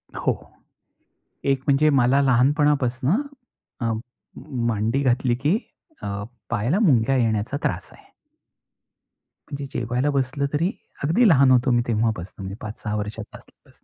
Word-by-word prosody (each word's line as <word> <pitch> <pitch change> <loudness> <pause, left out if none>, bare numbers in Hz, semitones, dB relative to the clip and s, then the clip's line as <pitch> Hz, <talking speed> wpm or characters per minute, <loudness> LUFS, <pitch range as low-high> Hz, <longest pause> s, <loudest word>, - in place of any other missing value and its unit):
हो. - - +1 1.1
एक 135 -1 +1
म्हणजे 145 +2 +4
मला 135 0 +3
लहानपणापासून 140 - +2 0.6
अ, 115 - 0 0.8
मांडी 115 +3 0
घातली 125 -1 +2
की 165 +8 +4 0.5
अ, - - -5 0.4
पायाला 120 - +1
मुंग्या 135 - +3
येण्याचा 115 +2 0
त्रास - - -2
आहे. - - -20 1.4
म्हणजे 140 -1 -4
जेवायला 125 +4 -1
बसलं 140 +1 -1
तरी, 165 +6 +1 0.3
अगदी 175 +12 +4
लहान 135 -4 +5
होतो 125 +1 +4
मी 120 0 +3
तेव्हापासून, 105 -4 -2
5-6 105 0 -5
वर्षाचा 105 +1 -5
असल्यापासून. - - -25
130 Hz, 115 wpm, -23 LUFS, 115-140 Hz, 1.4 s, लहान